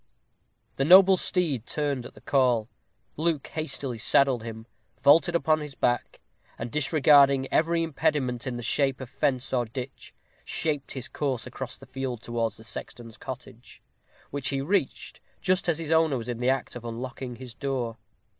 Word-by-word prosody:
The 135 - +2
noble 190 +5 +8
steed 160 - 0
turned 140 -5 -2
at - - -18
the - - -15
call. 125 -5 +2 0.5
Luke 160 -2 0
hastily 135 -6 -3
saddled 130 +1 +3
him, 110 0 -8 0.4
vaulted 165 +4 +5
upon 155 -2 +3
his 150 -3 -7
back, 120 0 0 0.4
and, 115 0 -5
disregarding 140 -2 +4
every 165 +1 +2
impediment 145 -6 -1
in 125 -2 -3
the 120 - -6
shape 135 +2 +1
of 130 -2 -8
fence 130 -1 -1
or 120 -2 +2
ditch, 125 +3 -8 0.3
shaped 145 -3 -2
his 130 -1 -5
course 135 -5 -2
across - - -6
the - - -14
field 130 -3 -5
towards 115 -2 -2
the 110 - -13
sexton's 115 0 -8
cottage, 130 -2 -10 0.5
which 140 -2 -2
he 135 - -1
reached 180 +9 -1 0.2
just 185 -1 +1
as 165 -1 +1
its 160 -1 -4
owner 160 -4 +3
was 115 -1 -6
in 120 -1 -3
the 125 +1 +1
act 135 -1 -1
of 120 - -7
unlocking 125 +2 -6
his 125 0 -10
door. 125 -4 -3
135 Hz, 165 wpm, -27 LUFS, 120-150 Hz, 0.5 s, noble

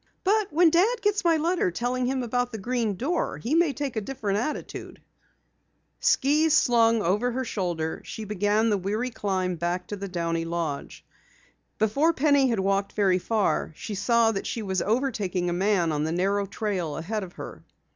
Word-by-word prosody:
"But 415 +1 +2
when 330 +1 +5
Dad 410 +9 +2
gets 415 -1 +1
my 335 -2 +4
letter 335 - +1
telling 245 +6 -1
him 260 0 -1
about 245 +1 -1
the 220 - -5
Green 230 -1 -1
Door 290 - -1
he 235 - -3
may 330 -2 +4
take 275 -1 -4
a 220 - -1
different 205 -3 -2
attitude!" 295 +7 -5 1.0
Skis 305 +3 +3
slung 230 -4 +3
over 210 +8 +1
her 260 +1 -2
shoulder, 175 -7 -3
she 220 - -7
began 210 +2 +1
the 205 - +1
weary 215 +7 -2
climb 185 -5 -2
back 175 +2 -2
to 205 - -3
the 200 0 -6
Downey 170 -2 -2
lodge. 165 -4 -4 0.7
Before 275 +10 +2
Penny 285 -2 +3
had 230 -5 0
walked 195 +1 0
very 190 -3 +2
far 210 -4 0
she 215 - -6
saw 225 +3 +3
that 195 - -4
she 225 - -3
was 190 -3 -1
overtaking 205 -7 0
a - - 0
man 185 -2 +1
on 150 -1 -1
the 160 - -1
narrow 195 +3 0
trail 190 -7 -3
ahead 205 +6 -3
of 180 -2 -9
her. - - -9
215 Hz, 180 wpm, -26 LUFS, 185-260 Hz, 1.0 s, when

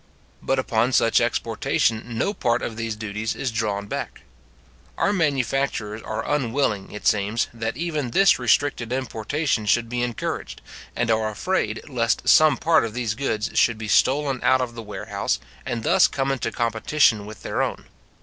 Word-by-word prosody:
But 135 - 0
upon 120 -1 +1
such 115 - +4
exportation 115 +1 0
no 200 - 0
part 120 - 0
of 115 - -4
these 115 -1 -3
duties 110 +1 -4
is 130 - -2
drawn 105 -3 -2
back. - - -5 0.8
Our 205 - +2
manufacturers 135 - -1
are 110 +1 -4
unwilling, 120 -7 0
it 105 - -8
seems, 105 +2 +1
that 115 +1 -4
even 155 -5 -2
this 195 +7 +4
restricted 125 -1 +1
importation 130 -1 -1
should 115 +2 +2
be 120 0 -2
encouraged, 120 -2 -4 0.3
and 115 -1 0
are 110 -1 +1
afraid 110 - -2
lest 120 -5 0
some 155 -1 +6
part 165 0 +3
of 115 -1 -4
these 120 -4 -1
goods 110 -3 -2
should 115 -2 +3
be 110 -1 -6
stolen 135 +4 +2
out 130 +1 +4
of 125 -2 -2
the 115 - -7
warehouse, 105 -2 -3 0.3
and 115 -2 -3
thus - - +5
come 135 0 -1
into 125 -4 -2
competition 115 -1 +1
with 110 - -11
their - - -1
own. - - -3
115 Hz, 165 wpm, -23 LUFS, 110-135 Hz, 0.8 s, some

